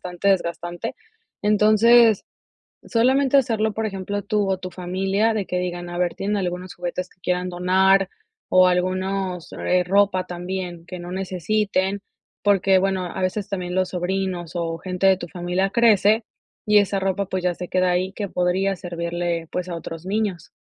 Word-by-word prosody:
bastante 180 +2 -2
desgastante. 175 -2 -1 0.5
Entonces, 215 +1 +5 0.6
solamente 265 +4 +3
hacerlo, 220 -4 +2
por 220 +1 -2
ejemplo, 200 0 -4
tú, 205 -1 0
o 190 - 0
tu 185 0 -7
familia, 190 +5 0
de 205 -3 -2
que 180 - -2
digan, 175 -1 -4
a 175 - -5
ver: 175 -1 0
"Tienen 205 +1 -1
algunos 180 -1 -3
juguetes 180 +1 -4
que 180 - -29
quieran 180 0 -1
donar, 190 +2 +3 0.4
o 185 0 +6
algunos 185 0 -1
eh, 180 0 +1
ropa 195 0 +2
también 180 -1 -5
que 180 0 -7
no 175 0 -8
necesiten", 195 +1 -1 0.4
porque, 195 -2 +4
bueno, 190 -1 0
a 180 - -5
veces 195 +2 -1
también 180 -2 -4
los 185 -1 +1
sobrinos 180 -1 -2
o 165 -1 -2
gente 180 +2 -1
de 190 -1 +6
tu 175 -1 -7
familia 180 +3 -1
crece 220 -1 +4 0.4
y 210 0 +6
esa 200 -1 +1
ropa, 195 +1 0
pues, 185 -1 -3
ya 180 -1 +1
se 180 +1 -7
queda 185 0 +2
ahí 185 +2 0
que 200 0 -4
podría 185 +2 0
servirle, 170 -1 -3
pues, 180 0 -3
a 170 - -3
otros 165 0 -7
niños. 200 -4 -2
185 Hz, 170 wpm, -23 LUFS, 180-200 Hz, 0.6 s, o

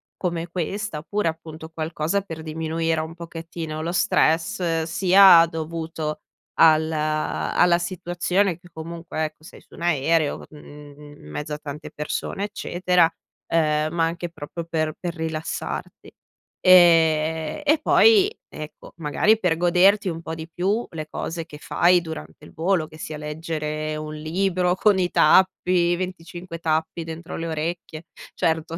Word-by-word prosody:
come 170 -2 -3
questa. 180 +1 -3
Oppure, 200 +5 -2
appunto, 160 -1 -6
qualcosa 160 +3 -2
per 165 -5 -8
diminuire 160 +1 -1
un 160 +1 -7
pochettino 165 -2 -6
lo 165 +2 -2
stress, 165 0 +1
sia 180 +1 +7
dovuto 160 -1 -5 0.3
al 160 -1 +6
uhm, - - -3
alla 155 - +1
situazione, 180 +1 -1
che, 175 0 -17
comunque, 165 0 -5
ecco, 155 0 -9
sei - - -13
su - - -18
un - - -12
aereo, 160 -1 +1
mhmm, 150 -1 -13 0.2
in 75 - -13
mezzo 150 - -5
a - - -3
tante 150 0 -8
persone, 150 +5 -4
eccetera, 180 -4 +1 0.4
uhm, 155 -2 +1
ma 170 -1 +1
anche 170 +1 -3
proprio 165 +1 -7
per 155 -2 -1
per 175 -1 -4
rilassarti. 160 -1 -5 0.5
Ehm, 160 - +5
e 300 +1 +4
poi, 415 +3 +5 0.2
ecco, 155 0 -10
magari, 170 +7 +2
per 180 -5 +1
goderti 185 +4 +4
un 165 -1 -5
po' 160 - -6
di 160 0 -8
più 195 +8 -1
le 155 -2 -6
cose 165 0 -4
che 150 - -11
fai 175 +3 +3
durante 160 -2 -9
il - - -15
volo, 170 -1 0
che 155 0 -14
sia 155 -1 -6
leggere 155 0 -4
un 155 0 -6
libro 180 +3 0
con 205 +1 +3
i 180 -1 +1
tappi, 180 -2 +4
25 175 -1 -6
tappi 160 +1 -1
dentro 165 +1 -7
le 165 - -4
orecchie. 160 0 -4 0.3
Certo, 160 0 -1
165 Hz, 145 wpm, -23 LUFS, 155-175 Hz, 0.5 s, sia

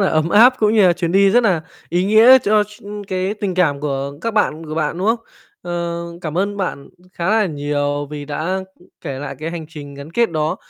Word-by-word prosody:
là 195 - +3
ấm 155 +1 +1
áp, 235 +7 +6
cũng 215 0 +2
như 215 - +5
là 175 - +5
chuyến 170 0 -2
đi 195 0 +5
rất 240 +4 +4
là 185 -8 +1 0.3
ý 175 +2 0
nghĩa 225 +6 +7
cho 210 -2 +2
s 210 +1 -17 0.3
cái 190 +1 -1
tình 200 -3 -3
cảm 155 -6 +1
của 140 -1 -3
các 230 +2 -3
bạn 160 -6 0
của 155 - -5
bạn, 160 +1 -1
đúng 190 - -1
không? 230 +2 +2 0.4
Ờ, 170 -1 -3 0.2
cảm 160 -1 -4
ơn 200 +1 -1
bạn 180 -8 -4 0.2
khá 170 +2 -2
là 220 -1 +3
nhiều 145 -2 -2
vì 150 -1 -6
đã, 155 +5 -3 0.2
ư, 180 - -21
kể 140 -5 -5
lại 145 - -6
cái 155 +2 -4
hành 165 -2 -6
trình 145 -3 -10
gắn 140 +2 -10
kết 235 -3 +2
đó. 155 -1 -1
170 Hz, 235 wpm, -19 LUFS, 150-205 Hz, 0.4 s, nghĩa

